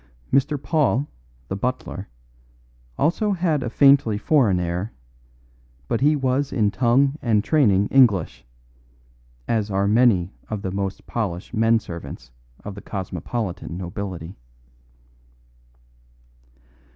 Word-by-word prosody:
Mr. 140 +2 +2
Paul, 145 -2 +1 0.4
the - - -3
butler, 105 -3 -4 0.9
also 200 +6 +1
had 170 -6 0
a 120 - -2
faintly 135 -4 +4
foreign 110 - +2
air, 90 +4 -3 0.9
but 115 - -1
he 150 +2 +4
was 135 0 0
in 105 -4 +1
tongue 130 +7 +2
and 110 -4 +2
training 105 -11 +3
English, 110 - +3 1.0
as 110 -2 0
are 100 0 +1
many 105 -5 +3 0.2
of 105 -2 -4
the 95 - -2
most 95 0 -4
polished 100 -5 -4
men 115 0 +3
servants 85 - -8 0.3
of 105 - -5
the 100 - -10
cosmopolitan 95 -1 -5
nobility. 90 -2 -6
110 Hz, 110 wpm, -23 LUFS, 95-135 Hz, 1.0 s, faintly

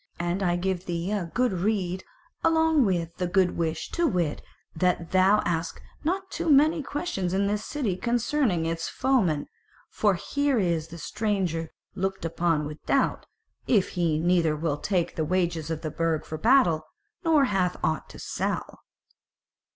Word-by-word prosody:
And 175 +3 -1
I 175 -2 +2
give 185 0 -2
thee 175 +2 -2
a 195 -5 -2
good 250 +2 +1
rede 185 -1 -1 0.4
along 320 -4 +4
with 170 -4 -1
the 180 - -1
good 185 0 +2
wish, 165 -1 -2
to 345 -1 +1
wit, 170 - -1 0.3
that 175 0 0
thou 190 +3 +5
ask 165 -1 -2 0.2
not 380 +4 -2
too 340 -1 -2
many 305 +3 +5
questions 260 - -2
in 200 +1 +2
this 205 +1 -1
city 245 -11 -2
concerning 235 - +1
its 165 0 -2
foemen: 190 - +1 0.5
for 205 -3 +2
here 285 +8 0
is 170 -6 0
the 170 +1 -10
stranger 185 -4 -2 0.2
looked 190 -2 -2
upon 165 -2 0
with 150 +1 -8
doubt, 275 - +1 0.4
if 205 -6 +3
he 170 -3 0
neither 165 -1 +2
will 150 -1 -1
take 180 -4 -1
the 160 - 0
wages 170 -2 0
of 160 -1 -3
the 155 - -4
Burg 165 -1 -1
for 155 - -6
battle, 170 - +4 0.4
nor 315 -4 +4
hath 190 -5 0
aught 155 - -1
to - - -11
sell." - - -3
180 Hz, 160 wpm, -26 LUFS, 165-225 Hz, 0.5 s, thou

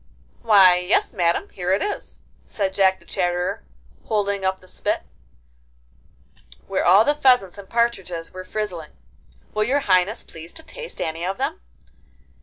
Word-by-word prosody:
'Why 195 -5 +6
yes, 180 +2 +1
Madam, 170 -4 0
here 180 -1 -3
it 195 - +1
is,' 415 - -5 0.2
said 195 -2 -2
Jack 190 -1 +3
the - - -22
Chatterer, 180 +1 -1 0.4
holding 200 -2 -1
up 190 0 0
the 185 - -19
spit, - - -2 1.6
where - - -1
all 195 +5 +6
the 290 - +3
pheasants 250 -10 +3
and 195 - -11
partridges 190 -8 -1
were 185 0 -7
frizzling. 185 -5 -5 0.6
'Will 215 - +1
your 280 +5 +1
Highness 190 +1 +2
please 165 +1 -12
to 320 - -9
taste 485 +7 -10
any 160 +1 -3
of 190 +2 -2
them? - - -3
190 Hz, 150 wpm, -22 LUFS, 180-215 Hz, 1.6 s, Why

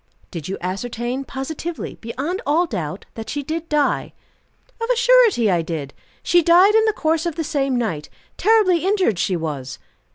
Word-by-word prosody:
"Did 165 -4 -6
you 195 - -4
ascertain 240 +8 -3
positively, 315 +6 -5
beyond 280 - -4
all 325 +5 +2
doubt, 170 - -5
that 225 -1 -7
she 290 0 -3
did 325 +3 -4
die?" 300 -1 0 0.7
"Of 460 - -2
a - - +3
surety 475 - +4
I 175 -2 +2
did. 160 -4 -5 0.3
She 350 - +4
died 355 +5 +6
in 445 0 +4
the 435 - +2
course 320 -2 0
of 335 - -3
the 325 - -2
same 280 -4 -1
night. 195 -12 -2 0.3
Terribly 405 -6 +3
injured 375 - +1
she 185 - +1
was." 145 -6 -4
285 Hz, 170 wpm, -21 LUFS, -, 0.7 s, died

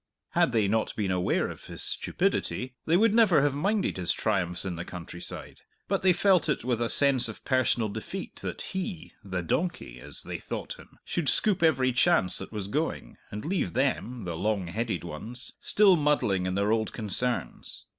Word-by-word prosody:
Had - - +2
they 110 -4 +2
not 110 +2 0
been 100 -3 -1
aware 90 0 +1
of - - -9
his - - -3
stupidity, 125 +9 -1
they 165 +2 +4
would 215 +1 +4
never 205 -11 +5
have 145 -2 +2
minded 195 - 0
his 90 -2 +1
triumphs 90 -1 -1
in 95 -2 -3
the 85 - -5
countryside; 90 0 -8 0.3
but - - 0
they 190 - +5
felt 185 -2 +3
it - - 0
with 120 -2 0
a 115 - +1
sense 135 -4 +5
of 110 - -9
personal 130 -3 +2
defeat 100 - -6
that - - -5
he 190 -2 -4
the 95 -3 -3
donkey, 85 - -2
as - - -5
they - - -5
thought - - -6
him - - -16
should 165 -6 0
scoop 200 - +2
every 130 -6 +3
chance 125 - +3
that - - -7
was 105 -3 -4
going, 150 +9 -3
and 105 +1 -6
leave 170 - -1
them, 125 -2 -1
the 85 -2 -4
long 100 +2 0
headed 105 +1 -3
ones, 110 +10 -7
still 200 -3 +5
muddling 145 - +1
in 90 - -1
their 100 +2 +1
old 110 -1 0
concerns. 120 +3 -3
120 Hz, 185 wpm, -28 LUFS, 95-155 Hz, 0.3 s, never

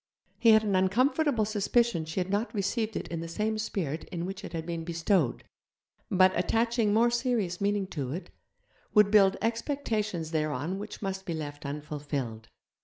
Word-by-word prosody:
He 230 - +5
had 220 0 +7
an 205 -3 +1
uncomfortable 240 +6 +2
suspicion 215 -3 +1
she 160 +4 -3
had 185 +1 -2
not 215 +3 -1
received 215 +2 -1
it - - -3
in 165 - -3
the 165 - -5
same 215 +5 -1
spirit 165 -8 -3
in 170 -1 -5
which 195 +2 -6
it - - -7
had 165 -1 -4
been 170 -1 -4
bestowed, 165 - +1 0.7
but, 185 0 +4
attaching 225 +4 +1
more 230 +3 +4
serious 235 -8 0
meaning 200 0 +1
to 135 -7 -4
it, 175 +6 -6 0.6
would 210 -1 +6
build 195 -2 +5
expectations 220 - -1
thereon 155 +3 -1
which 210 +1 -8
must 190 0 -4
be 170 - -2
left 145 -2 -6
unfulfilled. 140 -6 -5
195 Hz, 170 wpm, -29 LUFS, 165-220 Hz, 0.7 s, had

